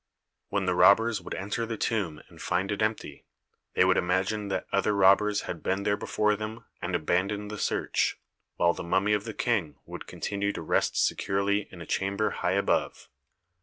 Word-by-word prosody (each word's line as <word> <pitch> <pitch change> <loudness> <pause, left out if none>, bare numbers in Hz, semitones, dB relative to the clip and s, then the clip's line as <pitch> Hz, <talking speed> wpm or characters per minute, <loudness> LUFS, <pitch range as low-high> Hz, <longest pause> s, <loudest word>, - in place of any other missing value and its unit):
When 100 -1 -1
the 90 - +1
robbers 110 +3 +5
would - - -6
enter 105 +4 -3
the 115 -1 -4
tomb 95 -11 -2
and - - -15
find 95 +3 -1
it 100 +1 -2
empty, 110 +1 -2 0.5
they - - +5
would - - +3
imagine 95 +4 0
that 95 -1 -2
other 100 +1 +1
robbers 100 +2 +4
had 85 - -6
been 95 +1 -1
there 100 0 +2
before 105 +1 0
them 110 +2 -6 0.2
and 90 0 -2
abandon 95 +5 0
the 105 -1 -6
search, - - 0 0.4
while 85 0 +3
the - - -7
mummy 95 +4 +1
of 105 0 0
the 110 - -6
King 100 - 0
would - - -9
continue 100 0 -2
to - - -5
rest - - +1
securely 100 +1 +1
in 90 - -11
a - - -7
chamber 100 +2 0
high 90 - -1
above. 100 +1 0
100 Hz, 185 wpm, -28 LUFS, 95-105 Hz, 0.5 s, robbers